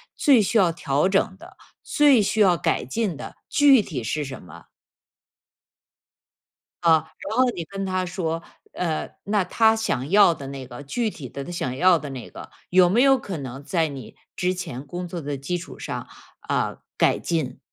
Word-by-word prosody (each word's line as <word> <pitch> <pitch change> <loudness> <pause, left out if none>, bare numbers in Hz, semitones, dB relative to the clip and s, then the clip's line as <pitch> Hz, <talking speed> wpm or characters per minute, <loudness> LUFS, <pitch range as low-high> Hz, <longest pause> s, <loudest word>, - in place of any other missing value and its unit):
最 270 -6 +5
需 215 +3 +1
要 185 -5 +4
调 150 +1 0
整 190 -1 +1
的， - - -14 0.3
最 285 -6 +4
需 210 +2 -1
要 190 -4 +5
改 135 - 0
进 190 - -2
的， - - -8
具 280 -4 +6
体 145 - -5
是 150 +7 -2
什 135 -2 -7
么？ 90 - -13 2.2
啊， 160 -2 +3 0.2
然 215 +3 -3
后 255 - +5
你 170 - -4
跟 195 +3 -5
他 185 -1 -1
说， 170 -2 -3 0.3
呃， 165 -3 -2
那 205 -1 +1
他 220 +4 +3
想 145 - -2
要 200 -3 +6
的 140 -4 -9
那 135 -1 -7
个 120 +3 -9
具 220 - -1
体 145 -10 -9
的 140 - -6
他 155 - -8
想 130 -7 -3
要 180 +5 +5
的 150 -2 -7
那 130 -3 -8
个， - - -10 0.2
有 180 0 +6
没 225 +7 +3
有 270 0 +6
可 200 -8 -6
能 135 -1 -7
在 165 +1 0
你 135 -6 -9 0.2
之 180 0 0
前 145 -8 -6
工 175 +5 -5
作 170 0 -6
的 145 -1 -4
基 140 +7 -3
础 175 - -10
上， - - -5 0.3
啊， - - -1 0.2
改 - - +3
进？ 145 -7 -2
175 Hz, 200 characters per minute, -24 LUFS, 140-200 Hz, 2.2 s, 具